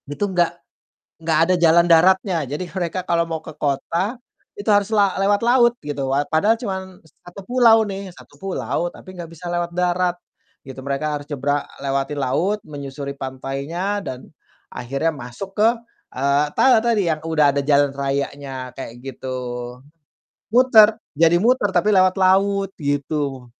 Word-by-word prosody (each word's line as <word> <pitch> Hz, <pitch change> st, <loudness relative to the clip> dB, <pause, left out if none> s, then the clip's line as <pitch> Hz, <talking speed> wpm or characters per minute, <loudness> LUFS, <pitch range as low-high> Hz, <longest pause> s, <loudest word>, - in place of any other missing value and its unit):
Itu 145 Hz, +8 st, -2 dB
enggak 175 Hz, -1 st, +1 dB, 0.6 s
enggak 160 Hz, -1 st, +1 dB
ada 185 Hz, -, +3 dB
jalan 170 Hz, 0 st, +5 dB
daratnya. 180 Hz, +2 st, +4 dB
Jadi 150 Hz, +6 st, -4 dB
mereka 185 Hz, 0 st, -3 dB
kalau 170 Hz, -2 st, +2 dB
mau 160 Hz, -1 st, -3 dB
ke 160 Hz, -, -8 dB
kota 170 Hz, -, -2 dB, 0.4 s
itu 205 Hz, +1 st, -1 dB
harus 205 Hz, -1 st, +3 dB
la 200 Hz, -3 st, +3 dB
lewat 205 Hz, +1 st, +2 dB
laut 240 Hz, -1 st, +5 dB
gitu. 145 Hz, -2 st, -3 dB
Wat 140 Hz, +2 st, +1 dB
padahal 205 Hz, +8 st, +4 dB
cuman 190 Hz, -5 st, -6 dB
satu 175 Hz, +4 st, -14 dB
pulau 235 Hz, -2 st, +5 dB
nih, 195 Hz, -1 st, -6 dB
satu -, -, -17 dB
pulau 165 Hz, -4 st, -2 dB
tapi 185 Hz, -, -13 dB
enggak 175 Hz, -3 st, -8 dB
bisa 165 Hz, +1 st, -13 dB
lewat 175 Hz, 0 st, -2 dB
darat 180 Hz, 0 st, 0 dB, 0.5 s
gitu, 130 Hz, 0 st, -9 dB
mereka 140 Hz, +3 st, -2 dB
harus 145 Hz, +1 st, -13 dB
nyebrang 145 Hz, 0 st, -1 dB, 0.2 s
lewati 140 Hz, +1 st, -2 dB
laut 145 Hz, +10 st, 0 dB
menyusuri 140 Hz, -1 st, -7 dB
pantainya 140 Hz, +9 st, -4 dB
dan 130 Hz, -8 st, -7 dB, 0.5 s
akhirnya 135 Hz, +6 st, -2 dB
masuk 140 Hz, +9 st, -8 dB
ke, 215 Hz, +3 st, +4 dB, 0.4 s
eee, 140 Hz, +3 st, +1 dB
tala 250 Hz, -4 st, +5 dB
tadi 225 Hz, -4 st, +1 dB
yang 155 Hz, -2 st, -1 dB
udah 160 Hz, -2 st, +2 dB
ada 140 Hz, -, 0 dB
jalan 140 Hz, 0 st, +2 dB
rayanya 135 Hz, -2 st, -4 dB
kayak 125 Hz, -2 st, -8 dB
gitu. 130 Hz, 0 st, -7 dB, 1.2 s
Muter, 225 Hz, -2 st, +6 dB, 0.2 s
jadi 165 Hz, +3 st, +4 dB
muter 225 Hz, +2 st, +2 dB
tapi 210 Hz, +4 st, +3 dB
lewat 185 Hz, -1 st, +4 dB
laut 195 Hz, +1 st, +2 dB
gitu. 145 Hz, -2 st, -2 dB
165 Hz, 155 wpm, -21 LUFS, 140-195 Hz, 1.2 s, Muter